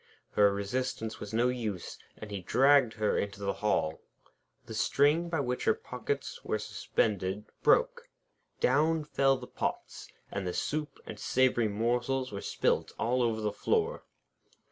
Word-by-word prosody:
Her 100 -1 +5
resistance 110 +2 -3
was 105 - -7
no 120 +3 +2
use, 110 -8 -4 0.2
and 105 -1 -9
he 100 -2 -4
dragged 130 +4 +4
her 110 -1 +1
into 100 0 -3
the 100 -1 -1
hall. 80 -7 0 0.6
The - - -8
string 145 +9 +2
by 165 -3 0
which 125 -1 -2
her - - +4
pockets 130 +2 -4
were - - -1
suspended 105 -1 -1 0.2
broke. - - +3 0.5
Down 160 - +3
fell 135 -2 +2
the - - -8
pots, - - -4 0.2
and 100 -2 -3
the 90 - -3
soup 150 0 -2
and - - -8
savoury 125 -3 +2
morsels 120 +5 0
were 100 -1 -5
spilt - - 0
all 125 +2 +1
over 115 -2 +1
the 105 -1 0
floor. 455 - 0
120 Hz, 150 wpm, -30 LUFS, 105-140 Hz, 0.6 s, Her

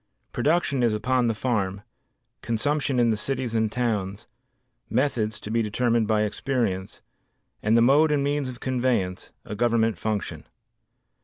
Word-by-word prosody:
Production 145 -4 +1
is 115 -3 +2
upon 125 +3 +1
the 115 - 0
farm, 100 -5 -1 0.6
consumption 135 +4 0
in 120 -1 +4
the - - +1
cities 125 +2 -2
and 110 -1 +1
towns, 105 -4 -2 0.6
methods, 115 -4 0
to 105 - -7
be 115 0 +2
determined 115 +1 +1
by 105 -1 +2
experience, 105 -4 -2 0.6
and 110 +2 +3
the 115 - +5
mode 145 +6 +5
and 145 -2 +2
means 145 -1 -1
of 125 -1 -9
conveyance, 125 -9 -1
a - - -6
government 115 0 +1
function. 110 -2 -3
115 Hz, 145 wpm, -25 LUFS, 105-130 Hz, 0.6 s, the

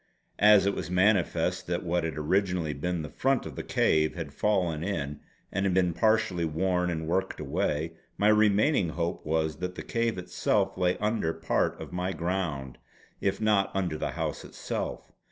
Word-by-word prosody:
As 105 -1 +7
it 100 - +2
was - - -4
manifest 95 +1 +2
that - - -1
what 85 0 0
had 80 -2 -3
originally 90 0 0
been 85 +3 -2
the 75 - -6
front 135 -1 +1
of - - -7
the - - -4
cave 80 0 +2
had 80 -5 -6
fallen 90 -7 0
in 75 -7 -3 0.3
and 95 -1 0
been 90 -2 +3
partly 110 -4 +2
worn 90 +3 0
and 80 -2 -3
worked 95 +3 -1
away, 75 +2 -1 0.3
my 105 - +4
remaining 105 - +4
hope 85 +1 -3
was 80 -1 0
that 90 +1 -4
the - - -6
cave 115 -3 -1
itself 90 0 0
lay 90 -1 +1
under 105 -6 0
part 80 0 0
of - - -8
my 90 +1 -1
ground 85 -8 -3 0.4
if 100 0 0
not 105 -3 +2
under 90 -5 0
the 75 - -3
house - - -3
itself. - - -5
90 Hz, 170 wpm, -28 LUFS, 80-100 Hz, 0.4 s, As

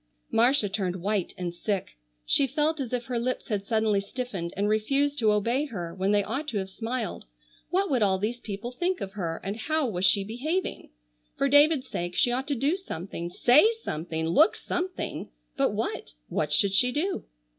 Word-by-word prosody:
Marcia 240 -1 +4
turned 190 -2 -2
white 195 +1 -1
and 175 -1 -3
sick. 185 - -3 0.3
She 270 - +3
felt 300 +4 0
as 260 -4 -3
if 250 -1 -1
her 245 -2 -1
lips 255 +2 -2
had 200 -2 -2
suddenly 220 -2 +2
stiffened 200 -5 -4
and 200 +1 +1
refused 275 +7 +1
to 220 -3 +4
obey 235 +7 +1
her 175 - -5
when 190 +2 0
they 205 -1 +3
ought 290 +9 -3
to 235 - -2
have 190 -1 -3
smiled. 230 +2 -4 0.4
What 385 +2 +2
would 255 -4 +2
all 195 -2 +3
these 220 +5 -2
people 215 +2 -5
think 355 +7 -1
of 190 - -5
her, 170 -5 -3
and 200 +1 -3
how 310 +7 0
was 185 -5 -3
she 195 +2 +4
behaving? 285 - -3 0.5
For 275 - +2
David's 290 -1 +5
sake 175 -5 -4
she 245 - +3
ought 260 +3 -1
to 285 - 0
do 280 +7 +1
something, 175 - -6
say 280 - +5
something, 160 +1 -3
look 290 - +5
something, 365 +1 -4 0.3
but - - +2
what—what - - -3
should 195 +6 +3
she 250 +6 +3
do? 345 +9 -1
220 Hz, 190 wpm, -27 LUFS, 190-275 Hz, 0.5 s, David's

